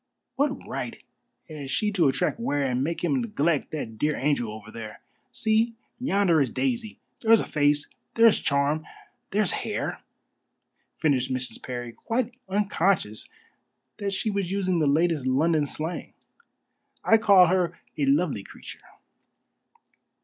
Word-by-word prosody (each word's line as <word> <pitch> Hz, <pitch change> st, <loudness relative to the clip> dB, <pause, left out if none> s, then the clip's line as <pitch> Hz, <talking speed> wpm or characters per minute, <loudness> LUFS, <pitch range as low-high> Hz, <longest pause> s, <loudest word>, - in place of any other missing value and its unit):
What 280 Hz, 0 st, -1 dB
right -, -, -5 dB, 0.5 s
has 150 Hz, -4 st, -7 dB
she 210 Hz, +8 st, 0 dB
to 180 Hz, -7 st, +3 dB
attract 175 Hz, +10 st, 0 dB
Ware 145 Hz, -12 st, 0 dB
and 130 Hz, -1 st, 0 dB
make 165 Hz, +4 st, -3 dB
him 255 Hz, +9 st, +1 dB
neglect 170 Hz, -, 0 dB
that 115 Hz, -8 st, -6 dB
dear 150 Hz, +3 st, +1 dB
angel 135 Hz, -6 st, 0 dB
over 110 Hz, 0 st, -10 dB
there? 110 Hz, -2 st, -8 dB, 0.3 s
See, 225 Hz, +1 st, +1 dB, 0.2 s
yonder 195 Hz, -, +3 dB
is 135 Hz, -, +1 dB
Daisy. 235 Hz, -5 st, -2 dB, 0.2 s
There's 225 Hz, -1 st, +5 dB
a -, -, -2 dB
face, 145 Hz, 0 st, +1 dB, 0.3 s
there's 230 Hz, -2 st, +6 dB
charm, 140 Hz, +2 st, +1 dB, 0.5 s
there's 210 Hz, -2 st, +1 dB
hair!" -, -, -3 dB, 1.0 s
finished 135 Hz, -4 st, +1 dB
Mrs. 130 Hz, 0 st, -3 dB
Parry, 120 Hz, -2 st, -5 dB
quite 240 Hz, -, -2 dB, 0.2 s
unconscious 190 Hz, -, 0 dB, 0.7 s
that 200 Hz, -1 st, -2 dB
she 215 Hz, +3 st, -1 dB
was 200 Hz, -3 st, -1 dB
using 185 Hz, -2 st, 0 dB
the 155 Hz, -, +2 dB
latest 155 Hz, -1 st, +2 dB
London 150 Hz, +3 st, +2 dB
slang. 160 Hz, +5 st, -5 dB, 0.9 s
"I 225 Hz, -, +5 dB
call 200 Hz, -4 st, +7 dB
her 180 Hz, 0 st, +1 dB, 0.2 s
a 145 Hz, -, 0 dB
lovely 140 Hz, -, +2 dB
creature." -, -, -11 dB
165 Hz, 135 wpm, -26 LUFS, 140-205 Hz, 1.0 s, call